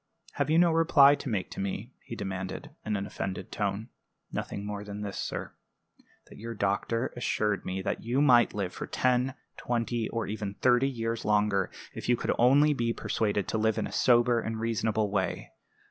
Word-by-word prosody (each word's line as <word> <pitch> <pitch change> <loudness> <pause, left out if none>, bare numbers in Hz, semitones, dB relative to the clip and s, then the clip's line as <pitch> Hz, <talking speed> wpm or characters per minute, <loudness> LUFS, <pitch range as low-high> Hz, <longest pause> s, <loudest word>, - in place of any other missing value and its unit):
"Have - - -1
you 160 - +4
no 170 0 +5
reply 160 -4 +6
to 140 -1 -4
make 100 -5 -2
to - - -7
me?" 100 +5 -4
he 115 - -7
demanded, 95 -3 -5
in 105 - -1
an 100 - -3
offended 95 -1 -5
tone. - - -2 0.4
"Nothing 100 - -4
more 105 0 -4
than 105 0 -7
this, 100 -1 -5
sir - - -4 0.7
that - - -14
your 115 +1 -6
doctor 105 +5 -1
assured 105 -4 -1
me 95 +1 -3
that - - -2
you 120 +4 0
might 125 -7 +5
live 95 -3 -2
for - - -6
ten, 130 +1 +1 0.2
twenty, 115 -1 -1
or 115 -1 -2
even 105 -1 -4
thirty 125 +4 +3
years 115 -2 -3
longer, 105 -2 +2 0.2
if - - -6
you 120 - +4
could - - 0
only 140 +5 +5
be 115 -3 0
persuaded 105 -4 -1
to 110 - 0
live 110 0 +1
in - - 0
a - - -7
sober 120 -1 +4
and 110 -1 -4
reasonable 110 -2 0
way. 95 -2 -2
115 Hz, 190 wpm, -29 LUFS, 100-125 Hz, 0.7 s, reply